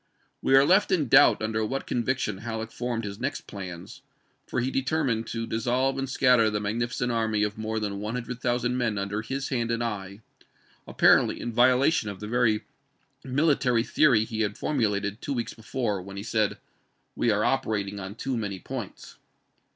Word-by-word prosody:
We 135 - +3
are 135 +1 +7
left 190 +6 +4
in 155 -9 +1
doubt 135 -4 +6
under 110 0 -1
what 135 +5 -3
conviction 120 -4 -1
Halleck 110 0 -5
formed 120 -1 -3
his 100 -1 -6
next - - -2
plans, 95 -2 -8 0.5
for - - -2
he 125 +2 -1
determined 135 -4 0
to 115 0 -3
dis 110 0 -3
solve 130 +2 +1
and 135 -1 -3
scatter 125 -4 +4
the 105 -1 -1
magnificent 120 +4 -2
army 110 -2 +1
of 105 0 -1
more 110 0 -3
than 100 -2 -3
one 105 +3 -4
hundred 125 0 -5
thousand 120 0 0
men 115 -4 0
under 100 +2 -2
his 135 +4 -4
hand 120 -3 -1
and 115 0 0
eye; 100 -3 -5 0.7
apparently - - +4
in 120 - -4
violation 130 +1 +3
of 100 -2 -7
the 105 - -6
very 115 -2 +2 0.6
mili 140 +3 +2
tary 120 -3 +2
theory 130 -5 +4
he 110 -1 -3
had 105 -1 -1
formulated 105 -6 -1
two 140 - -3
weeks 120 -3 -3
before, 110 -3 -3
when 100 +2 -9
he 100 - -5
said, 110 -2 0 0.6
"We 120 - +1
are 105 -1 +2
operating 105 -6 -1
on 95 +1 -7
too 135 +2 -3
many 100 -4 -3
points." 90 - -8
115 Hz, 185 wpm, -26 LUFS, 105-125 Hz, 0.7 s, are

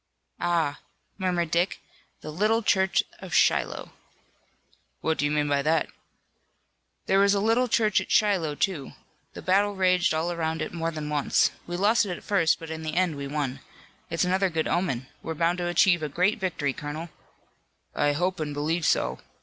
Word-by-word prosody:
"Ah," 165 -4 0 0.4
murmured 175 -3 0
Dick, 175 +3 +1 0.4
"the 155 - -7
little 215 +7 +1
church 190 -2 +2 0.2
of - - -5
Shiloh!" - - +2 1.1
"What 160 0 -1
do 145 - +2
you - - +1
mean 150 0 +1
by 140 -1 +1
that?" 155 +2 +1 1.2
"There 195 - +3
was 200 0 +4
a - - +1
little 225 +4 +2
church 220 -3 +2
at - - -8
Shiloh, 185 -8 +2
too. 155 -4 -2 0.4
The - - -9
battle 200 +2 +2
raged 185 -2 +3
all 165 +2 -1
around 160 -1 -2
it - - -6
more 165 -1 -2
than 155 -2 -5
once. 145 -2 +2 0.2
We 175 0 -3
lost 210 +3 +3
it 180 -2 -4
at - - -14
first, 170 -6 +2
but 165 -1 -9
in 160 0 -5
the 155 -1 -4
end 180 -3 +1
we 140 0 -5
won. 140 -2 -3 0.5
It's 165 - 0
another 190 +1 +1
good 160 -2 -1
omen. 150 -9 -1 0.2
We're 160 - -5
bound 170 +3 +1
to 175 - -1
achieve 175 0 +3
a 155 - -3
great 180 +9 +1
victory, 160 -7 -1
colonel." 150 +5 -6 0.8
"I 145 0 +1
hope 180 +4 -1
and 150 -2 -3
believe 160 +3 0
so. - - +1
170 Hz, 180 wpm, -26 LUFS, 155-190 Hz, 1.2 s, was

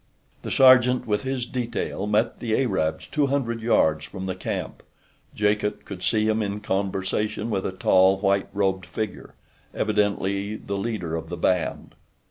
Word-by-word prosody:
The - - -6
sergeant 130 -1 +5
with 105 -2 0
his 130 -2 -2
detail 120 -4 -3
met 105 +3 +1
the 115 -2 0
Arabs 95 -11 0
two 145 -2 0
hundred 120 -5 -1
yards 80 -9 +2
from 95 +3 -7
the 95 - -2
camp. 95 - -5 0.5
Jacot 105 0 0
could 95 -3 -8
see 110 +1 +1
him 110 0 +1
in 100 0 -2
conversation 100 +2 -2
with 95 -2 -1
a - - -3
tall, 95 0 +4
white 100 0 +1
robed 95 -2 0
figure—evidently 105 +1 -3
the 100 - -6
leader 100 -6 -3
of 80 0 -5
the 90 - -5
band. 90 -3 -1
105 Hz, 150 wpm, -24 LUFS, 95-115 Hz, 0.5 s, sergeant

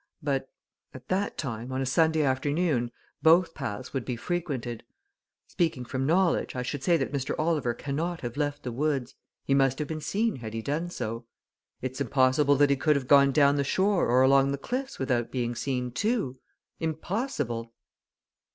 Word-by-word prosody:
But 135 -2 -1 0.5
at 130 -1 -12
that 195 +2 -1
time, 120 -3 -4
on 130 - -2
a 135 - 0
Sunday 160 +3 +3
afternoon, 140 -1 +1 0.3
both 165 +1 +5
paths 130 -2 -5
would 135 -3 -1
be 125 - -3
frequented. 130 -6 -3 0.6
Speaking 160 -8 -1
from 130 +2 -2
knowledge, 175 -2 +2
I 125 - -2
should 135 +2 -4
say 170 -2 +4
that 135 - -2
Mr. 135 -2 -2
Oliver 150 -7 0
cannot 160 +7 -3
have 120 -1 -5
left 145 0 -2
the 125 - -3
woods 135 -1 -1 0.3
he 135 - +1
must 135 -1 +3
have 150 - -3
been 155 0 -4
seen 210 +7 0
had 110 -2 -7
he 115 - -3
done 155 +7 -2
so. 115 -7 -5 0.6
It's 130 +2 -4
impossible 140 +1 +3
that 140 0 +4
he - - +4
could 150 +2 +3
have 135 -3 -2
gone 140 0 +6
down 140 0 +5
to - - -1
the 140 - +2
shore 190 +6 +2
or 125 +2 +4
along 135 +1 +5
the 140 - -1
cliffs 260 - -4
without 125 -3 0
being 120 -2 -2
seen, 125 0 -2
too 200 - -1 0.4
impossible!" 160 - -3
140 Hz, 180 wpm, -28 LUFS, 125-160 Hz, 0.6 s, gone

